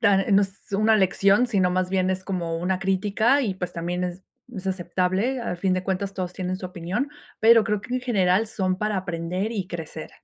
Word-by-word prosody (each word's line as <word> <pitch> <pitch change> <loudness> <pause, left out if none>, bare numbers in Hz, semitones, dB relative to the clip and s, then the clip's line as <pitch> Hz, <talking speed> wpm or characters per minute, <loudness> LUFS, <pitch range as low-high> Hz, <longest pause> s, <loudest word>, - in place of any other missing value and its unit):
Tan, 205 -4 +4
eh, 195 - -1
no 200 +1 +6
es 195 0 -6
una 215 +2 +4
lección, 200 +4 +3
sino 190 -6 +2
más 185 0 0
bien 185 -1 +1
es 185 0 -2
como 170 -4 -2
una 180 +2 0
crítica, 205 +8 +2
y 200 -6 -1
pues, 180 -2 -5
también 175 +2 -2
es 180 +1 -5 0.3
es 195 -4 -7
aceptable. 190 +6 0
Al 180 -6 -3
fin 185 +1 +1
de 185 - -2
cuentas 195 +1 -2
todos 185 -2 -4
tienen 185 0 -3
su 185 - -6
opinión, 185 +9 -3 0.3
pero 225 0 +7
creo 210 -2 -1
que 250 +4 -5
en 255 - 0
general 205 -4 +2
son 185 -4 -1
para 210 -1 -1
aprender 180 +3 -2
y 195 -5 -3
crecer. 160 -2 -7
190 Hz, 215 wpm, -24 LUFS, 180-210 Hz, 0.3 s, pero